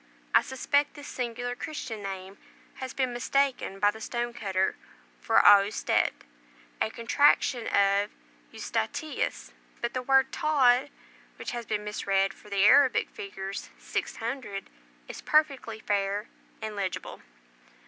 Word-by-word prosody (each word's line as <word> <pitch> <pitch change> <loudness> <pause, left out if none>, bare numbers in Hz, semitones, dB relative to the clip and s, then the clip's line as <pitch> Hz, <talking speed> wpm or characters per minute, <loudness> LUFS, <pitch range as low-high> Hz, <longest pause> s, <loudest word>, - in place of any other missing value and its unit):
I - - +7
suspect 285 +3 0
this 290 -1 -9
singular 245 0 -3
Christian 245 -6 -6
name 195 0 -7 0.4
has 260 -1 -5
been 260 -2 -1
mistaken 260 -4 0
by 205 +1 +4
the 220 - -12
stone 240 +1 -3
cutter 190 -4 0 0.4
for 225 - +3
Austet, 205 +1 +5 0.7
a - - +2
contraction 240 +1 +2
of 200 +1 +3 0.4
Eustatius, 300 - -3 0.3
but 235 +1 -2
the 255 - -1
word 265 +1 +3
Tod, 275 -3 +3 0.5
which - - -6
has 240 -2 -5
been 210 -1 -1
mis 210 0 -5
read 195 0 +2
for 210 - -17
the 200 0 +3
Arabic 265 +4 +5
figures 200 - -6
600, 225 -4 -4 0.4
is - - -8
perfectly 275 -7 +1
fair 205 0 -1 0.4
and 215 -1 -4
legible. 185 -3 -4
230 Hz, 130 wpm, -28 LUFS, 200-265 Hz, 0.7 s, I